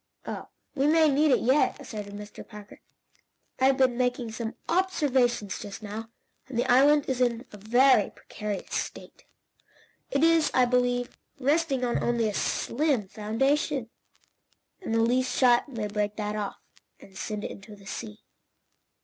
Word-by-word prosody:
"Oh, - - -6 0.3
we 280 -1 +1
may 315 0 +5
need 295 +2 +3
it 265 - +3
yet," 265 +5 +2
asserted 210 -7 -7
Mr. 205 0 -10
Parker. 210 -2 -12 0.8
"I 260 - +3
have 270 0 +4
been 255 -2 +2
making 245 -2 0
some 225 0 -5
observations 270 - +1
just 205 +1 -8
now, 215 +2 -6 0.4
and 260 -3 -6
the 240 - +2
island 285 +3 +5
is 255 -1 -1
in 240 0 +1
a 210 - -10
very 240 +2 +4
precarious 210 -2 -6
state. - - -5 0.8
It 280 +2 +1
is, 330 -1 +4
I 255 - +5
believe, 245 0 0 0.2
resting 280 -1 +1
on 240 - 0
only 235 -2 +1
a 210 - -2
slim 250 -2 0
foundation, 250 +4 0 0.9
and 225 -11 -2
the 225 - +3
least 255 +3 +1
shock 245 0 +4
may 225 -5 -4
break 210 0 -2
that 210 -1 -3
off, 205 -2 -4 0.4
and 190 - -16
send 210 +1 -4
it - - -4
into 205 +2 -11
the 200 -1 -17
sea. 210 +1 -7
245 Hz, 160 wpm, -27 LUFS, 210-270 Hz, 0.9 s, may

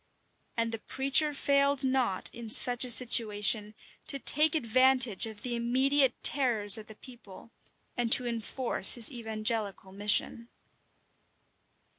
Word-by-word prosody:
And 230 0 -3
the 225 - -8
preacher 275 +6 -2
failed 280 -1 -1
not, 260 -7 -3
in 235 -1 -11
such 245 +2 +3
a 250 - +1
situation, 215 -3 +1 0.3
to 275 - -7
take 300 +3 +3
advantage 255 - +1
of 215 -2 -13
the 245 -1 -5
immediate 260 +3 -1
terrors 230 -7 +5
of 215 - -14
the 220 - -15
people, 230 -3 -17 0.4
and 240 -2 -5
to 250 - +1
enforce 235 +2 0
his 235 0 0
evangelical 220 -4 -6
mission. 210 +4 -3
235 Hz, 125 wpm, -26 LUFS, 215-265 Hz, 0.4 s, terrors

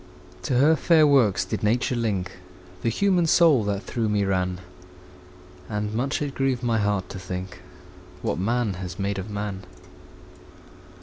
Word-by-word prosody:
To 125 - 0
her 150 +5 +5
fair 160 -2 +4
works 125 -11 +3
did 95 - -4
Nature 120 +4 +1
link 100 -6 -1 0.5
The 115 - +1
human 180 - +2
soul 160 -8 +5
that 100 -1 -2
through 115 -3 -2
me 105 -1 +1
ran; 90 -1 -1 1.1
And 105 0 -3
much 135 +6 -1
it 140 -2 -4
grieved 135 -2 -1
my 115 -2 +1
heart 100 -2 0
to 95 - -7
think 90 +1 -6 0.6
What - - -1
man 115 +1 0
has 90 -1 -6
made 100 0 -2
of 95 +3 -6
man. 100 -2 -4
105 Hz, 150 wpm, -24 LUFS, 95-130 Hz, 1.1 s, her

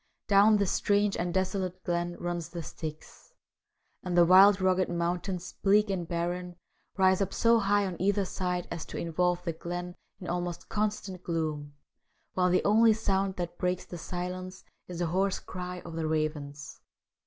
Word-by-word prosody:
Down 205 +2 +6
this 200 -2 +1
strange 205 0 +2
and 175 0 -2
desolate 185 0 -2
glen 175 0 -1
runs 175 -2 -4
the 170 -1 -6
Styx, 155 -1 -9 0.7
and 180 -1 -2
the 175 - +7
wild, 195 +3 +7
rugged 185 0 +2
mountains, 175 +1 -2
bleak 205 +1 +4
and 175 -3 -3
barren, 175 +1 -3 0.4
rise 190 0 +4
up 195 - 0
so 230 0 +4
high 205 0 +2
on 180 -3 -5
either 200 +1 +2
side 180 -1 -2
as 170 -2 -4
to - - -7
involve 175 +1 0
the 170 - -2
glen 175 +2 -5 0.2
in 180 - -8
almost 175 0 -3
constant 205 -3 -2
gloom, 155 -4 -3 0.6
while 180 -1 +2
the 180 +1 +2
only 220 +2 +6
sound 195 -3 0
that 175 -1 -5
breaks 180 0 -1
the 175 - -8
silence 185 +2 -5 0.2
is 180 - -7
the 175 - 0
hoarse 185 +3 +1
cry 180 -1 -7
of 170 - -9
the 160 -1 -2
ravens. 150 -2 -3
180 Hz, 165 wpm, -29 LUFS, 170-195 Hz, 0.7 s, the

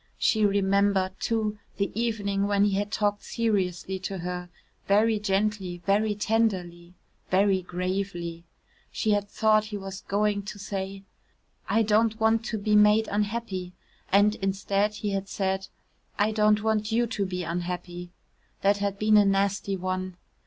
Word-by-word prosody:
She 215 -2 +3
remembered, 200 -1 +2
too, 215 -2 -1 0.2
the 200 -1 -1
evening 205 -3 -1
when 200 -1 +2
he 205 - +2
had 205 +2 -1
talked 205 -1 0
seriously 190 -5 -1
to 190 +1 -4
her 180 0 -5 0.4
very 215 +2 +3
gently, 195 -3 -1
very 210 +1 +2
tenderly, 185 -6 -1 0.3
very 190 0 +3
gravely. 180 -2 -3 0.5
She 220 - 0
had 205 -1 0
thought 215 0 +3
he 210 -1 -5
was 195 -1 -7
going 205 0 0
to 200 +1 -8
say, 195 -1 -5 0.7
"I 225 - +3
don't 220 +1 +2
want 220 0 +3
to 225 - -2
be 210 +1 +1
made 210 +1 +5
unhappy," 205 -3 -2 0.4
and, 205 +2 +5
instead, 195 +2 0
he 205 0 -3
had 195 0 -3
said, 190 -1 -2 0.5
"I 210 +2 +2
don't 210 -1 +3
want 220 0 0
you 235 +2 +2
to 215 -3 -2
be 180 -1 -3
unhappy." 175 +1 -4 0.5
That 200 +1 +4
had 200 -1 -2
been 215 +1 +4
a 205 - +7
nasty 195 0 +1
one. 185 0 -3
200 Hz, 150 wpm, -27 LUFS, 190-210 Hz, 0.7 s, a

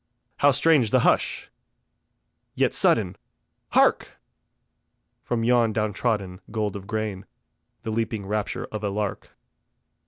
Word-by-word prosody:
How 145 - +5
strange 140 -3 +4
the - - +3
hush! - - +1 1.0
Yet - - +1
sudden, 95 -5 +2 0.6
hark! - - +2 1.0
From 120 -2 -2
yon 120 -2 +3
down 105 -1 -1
trodden 100 -4 -2
gold 105 -2 -2
of 100 -1 -8
grain, 105 -3 -4 0.6
The 110 - -4
leaping 110 -2 -2
rapture 105 +1 -3
of 110 -1 -5
a 100 - 0
lark. 105 0 -4
110 Hz, 120 wpm, -24 LUFS, 100-115 Hz, 1.0 s, How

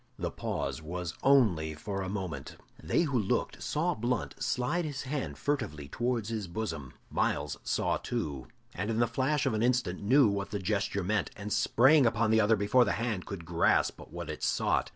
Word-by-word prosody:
The - - -3
pause - - -3
was 85 +1 -4
only 95 - +3
for 100 +5 -4
a 95 - -3
moment. 90 -9 -5 0.2
They - - +2
who 140 -7 +1
looked 100 - -1
saw 170 +4 0
Blunt 120 +1 -2
slide 125 +10 0
his 145 -4 -4
hand 140 0 -3
furtively 105 - -2
towards 120 - -1
his 110 -4 -3
bosom. 80 - -4 0.2
Myles - - 0
saw - - 0
too, 70 -4 -4 0.3
and 100 +4 -3
in 110 - 0
the 120 - +4
flash 130 +5 0
of - - +1
an 110 - 0
instant 120 -7 +1
knew 130 +5 +5
what 100 -1 -1
the 105 - -2
gesture 100 0 -1
meant, 105 +3 0
and 105 -2 -4
sprang 130 +5 +5
upon 115 -1 +1
the 110 0 +5
other 110 +2 +4
before 105 +5 +4
the - - 0
hand 115 -6 -2
could 95 -4 -6
grasp 85 0 +2
what 85 -1 -6
it 75 - -8
sought. - - +1
110 Hz, 190 wpm, -30 LUFS, 90-125 Hz, 0.3 s, knew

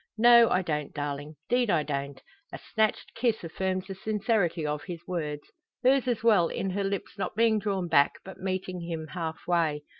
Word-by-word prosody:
"No, 235 0 +7
I 185 - +2
don't, 150 -4 -3
darling 145 +1 -4
'deed 245 -2 +2
I 165 -5 +3
don't." 140 -1 -4 0.3
A - - -6 0.2
snatched 220 -1 +1
kiss 230 -4 0
affirms 185 +2 -2
the 195 - -6
sincerity 200 -5 0
of 150 0 -3
his 175 -2 -7
words; 150 -5 -3 0.4
hers 265 0 +4
as 235 -3 0
well, 205 -7 +5
in 190 +3 -3
her 200 +2 -1
lips 195 0 -4
not 195 - -3
being 225 -1 +3
drawn 195 -4 -1
back, 145 -3 +4
but 190 - -10
meeting 185 -1 -3
him 165 -2 -5
halfway. 165 -2 -1
185 Hz, 180 wpm, -28 LUFS, 160-215 Hz, 0.4 s, No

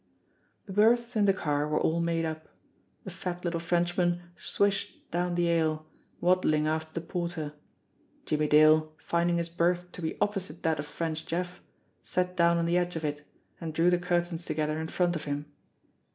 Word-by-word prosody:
The 195 - -7
berths 235 +4 +3
in 210 -2 +4
the 195 - +6
car 150 -5 0
were 150 0 +1
all 165 +1 +1
made 165 -1 0
up. 160 0 -5 0.6
The - - -7
fat 180 0 -5
little 170 -1 0
Frenchman 175 +1 +1 0.2
swished 200 +1 -1
down 175 +1 0
the 175 -1 +2
aisle, 155 -1 +1 0.3
waddling 175 -4 +3
after 160 0 -1
the 165 0 -4
porter. 170 -4 -3 0.7
Jimmie 150 0 +1
Dale, 155 +1 +5
finding 170 +3 +1
his 170 0 -1
berth 175 +1 0
to 180 - -9
be 160 - -3
opposite 190 -6 -2
that 160 -2 +1
of 145 - -4
French 160 +1 -3
Jeff, 180 +2 -3 0.4
sat 180 0 -1
down 170 -1 +4
on 170 - +1
the 175 +1 +3
edge 175 0 -2
of 160 -1 -3
it, 145 0 -3 0.4
and 160 -2 -5
drew 170 +2 +4
the 175 - +3
cur 175 -1 +2
tains 175 -1 -6
together 155 -1 -1
in 160 - -3
front 175 +1 +1
of 155 - -4
him. 145 0 -3
170 Hz, 185 wpm, -29 LUFS, 155-180 Hz, 0.7 s, the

